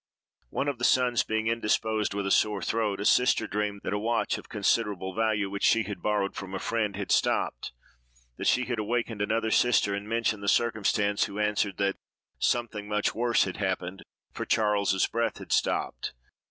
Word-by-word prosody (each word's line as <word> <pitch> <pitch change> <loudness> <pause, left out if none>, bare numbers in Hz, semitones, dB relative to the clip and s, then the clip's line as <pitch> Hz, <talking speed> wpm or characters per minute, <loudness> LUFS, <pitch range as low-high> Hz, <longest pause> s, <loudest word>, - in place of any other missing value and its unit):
One 140 - -2
of 140 -4 -2
the - - -6
sons 125 -2 +3
being 110 0 -1
indisposed 110 -2 0
with 100 -1 -2
a 95 - -1
sore 105 -2 +2
throat, 110 -3 -1
a 105 - -3
sister 125 +3 +4
dreamed 105 -1 -2
that - - -2
a 105 - 0
watch, 115 +2 0
of - - -15
considerable 100 -3 0
value, 110 -1 +1
which 100 +1 -5
she 115 - +4
had 105 -1 -6
borrowed 105 -2 0
from 95 0 -6
a - - -3
friend, 110 -3 -1
had 100 0 -4
stopped; - - +1 0.7
that - - -2
she 125 - +3
had 120 -2 -2
awakened 115 0 -2
another 110 +2 0
sister 105 -5 +3
and 100 +1 -5
mentioned 115 -2 0
the 100 - -5
circumstance, 105 -2 +2
who 100 - -8
answered 105 -2 0
that 100 0 0 0.4
"something 110 -4 -1
much 105 0 0
worse 120 0 +2
had 95 - -4
happened, 95 0 -3 0.3
for - - -4
Charles's 100 -3 +2
breath 115 0 -1
had - - -10
stopped." - - 0
105 Hz, 185 wpm, -28 LUFS, 100-115 Hz, 0.7 s, sister